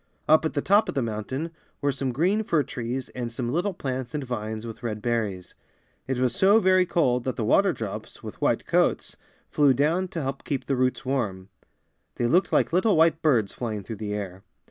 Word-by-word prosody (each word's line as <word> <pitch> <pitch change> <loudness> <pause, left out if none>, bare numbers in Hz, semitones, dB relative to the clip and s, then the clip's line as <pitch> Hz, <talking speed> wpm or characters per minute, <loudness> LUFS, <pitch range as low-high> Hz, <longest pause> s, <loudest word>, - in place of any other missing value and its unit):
Up 155 +1 +5
at 160 - -2
the 145 - 0
top 205 +3 +4
of - - -4
the 135 - +1
mountain 115 +9 -4 0.3
were 140 -1 +1
some 135 -1 -2
green 185 - +1
fir 160 -7 +1
trees 125 0 -4
and 120 -2 -5
some 120 0 -3
little 180 +6 -1
plants 130 -2 -4
and 145 - -2
vines 110 -3 -4
with 115 0 -8
red 110 -3 -3
berries. 105 -5 -2 0.5
It 130 -1 -1
was 125 -2 +1
so 200 +3 +5
very 185 -2 +4
cold 125 -9 +1
that 130 - -1
the 115 - -2
water 195 - +4
drops, 110 - -7
with - - -9
white - - +1
coats, - - +1 0.4
flew 140 -3 +4
down 160 +8 +1
to 165 -3 -4
help 135 +1 -4
keep 140 -3 -3
the 135 - 0
roots 130 +1 0
warm. 100 -8 -2 0.7
They 120 - -1
looked 175 +10 +3
like - - +2
little 185 +1 +3
white 165 0 +4
birds 120 -11 +2
flying 110 -4 -4
through 110 +3 -7
the 105 0 -3
air. 95 -2 -6
130 Hz, 210 wpm, -25 LUFS, 115-160 Hz, 0.7 s, Up